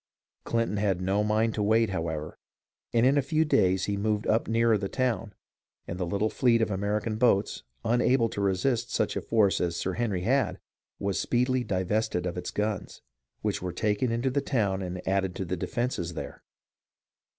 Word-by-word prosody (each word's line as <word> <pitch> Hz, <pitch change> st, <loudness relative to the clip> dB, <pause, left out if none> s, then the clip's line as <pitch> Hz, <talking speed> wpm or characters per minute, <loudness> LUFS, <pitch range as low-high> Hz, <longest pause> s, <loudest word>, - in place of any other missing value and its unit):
Clinton 115 Hz, -2 st, 0 dB
had 100 Hz, -3 st, +1 dB
no 95 Hz, +3 st, +1 dB
mind 110 Hz, +1 st, +1 dB
to 105 Hz, -, -2 dB
wait, 110 Hz, +1 st, +3 dB
however, 80 Hz, -4 st, -4 dB, 0.5 s
and 115 Hz, +1 st, +3 dB
in 140 Hz, +2 st, +4 dB
a -, -, +3 dB
few 155 Hz, +3 st, +1 dB
days 95 Hz, -10 st, +2 dB
he 100 Hz, -, -1 dB
moved 105 Hz, +1 st, -1 dB
up 110 Hz, +1 st, +1 dB
nearer 115 Hz, 0 st, +3 dB
the 100 Hz, -2 st, -2 dB
town, 125 Hz, -4 st, -1 dB, 0.6 s
and 85 Hz, -, -5 dB
the 90 Hz, -, -1 dB
little 100 Hz, +4 st, 0 dB
fleet 120 Hz, -2 st, +3 dB
of 110 Hz, -, +1 dB
Ameri 100 Hz, +2 st, -1 dB
can 110 Hz, -2 st, -2 dB
boats, 110 Hz, -4 st, +2 dB, 0.2 s
unable 120 Hz, +1 st, +3 dB
to 100 Hz, -, -4 dB
resist 115 Hz, +5 st, 0 dB
such -, -, 0 dB
a -, -, -1 dB
force 105 Hz, -4 st, +2 dB
as 85 Hz, -1 st, 0 dB
Sir 95 Hz, -, -2 dB
Henry 105 Hz, -4 st, -1 dB
had, 125 Hz, +2 st, +1 dB, 0.4 s
was 100 Hz, -4 st, -1 dB
speedily 125 Hz, +1 st, +1 dB
divested 95 Hz, -1 st, -1 dB
of 90 Hz, -, -3 dB
its 90 Hz, -, -4 dB
guns, 105 Hz, -2 st, -3 dB, 0.4 s
which -, -, -1 dB
were 90 Hz, 0 st, -3 dB
taken 110 Hz, +5 st, 0 dB
into 120 Hz, +3 st, 0 dB
the 140 Hz, +2 st, +1 dB
town 100 Hz, -9 st, 0 dB
and 90 Hz, -1 st, -6 dB
added 95 Hz, -1 st, 0 dB
to 95 Hz, -, -3 dB
the 90 Hz, +1 st, -2 dB
defences 90 Hz, -4 st, -2 dB
there. -, -, -7 dB
105 Hz, 185 wpm, -28 LUFS, 95-115 Hz, 0.6 s, in